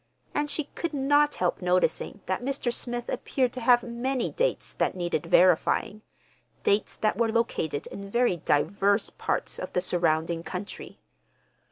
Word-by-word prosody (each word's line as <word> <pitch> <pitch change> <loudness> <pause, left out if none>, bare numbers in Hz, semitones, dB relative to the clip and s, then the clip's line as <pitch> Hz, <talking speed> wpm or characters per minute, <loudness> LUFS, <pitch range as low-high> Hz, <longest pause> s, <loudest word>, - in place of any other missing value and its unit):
And 295 0 0
she 310 - 0
could 335 -3 -3
not 290 +2 +3
help 180 +1 -1
noticing 180 +2 0
that 185 +4 -2
Mr. 260 -2 -1
Smith 240 -1 -3
appeared 255 -3 -1
to 255 - -5
have 240 +1 +5
many 245 +2 -2
dates - - -1
that - - 0
needed 175 -4 -2
verifying—dates 200 +3 +1
that 215 -2 0
were 230 -1 +2
located 220 -10 -1
in 200 0 -8
very 235 -4 +2
diverse 200 +8 +1
parts - - -2
of - - -6
the 180 - +1
surrounding 165 -2 +1
country. 185 +4 -7
215 Hz, 145 wpm, -27 LUFS, 180-250 Hz, -, have